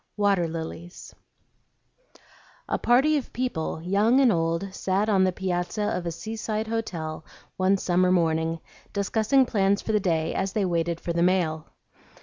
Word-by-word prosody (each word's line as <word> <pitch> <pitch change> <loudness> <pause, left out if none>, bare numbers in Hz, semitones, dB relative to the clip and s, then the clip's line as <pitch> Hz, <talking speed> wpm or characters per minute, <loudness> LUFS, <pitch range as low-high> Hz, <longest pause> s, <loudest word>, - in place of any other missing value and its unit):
WATER 200 -4 +2
LILIES 165 +2 -7 1.5
A - - -1
PARTY 275 +6 +3
of 275 - -5
people, 165 -10 -3
young 205 +8 +3
and 260 -4 +5
old, 165 +2 -1
sat 195 +3 0
on 195 -3 +4
the 185 - +3
piazza 185 +3 -2
of 180 -4 -2
a - - -1
seaside 220 +4 -4
hotel 170 -9 -4 0.3
one 190 +1 +3
summer 180 0 +2
morning, 165 -2 +1 0.3
discussing 220 +6 +2
plans 200 -3 +1
for - - -2
the 210 - +3
day 165 -4 0
as 190 0 -2
they 205 -2 +1
waited 170 -1 -1
for 170 - -3
the 170 - 0
mail. 170 -4 +1
185 Hz, 150 wpm, -25 LUFS, 170-215 Hz, 1.5 s, and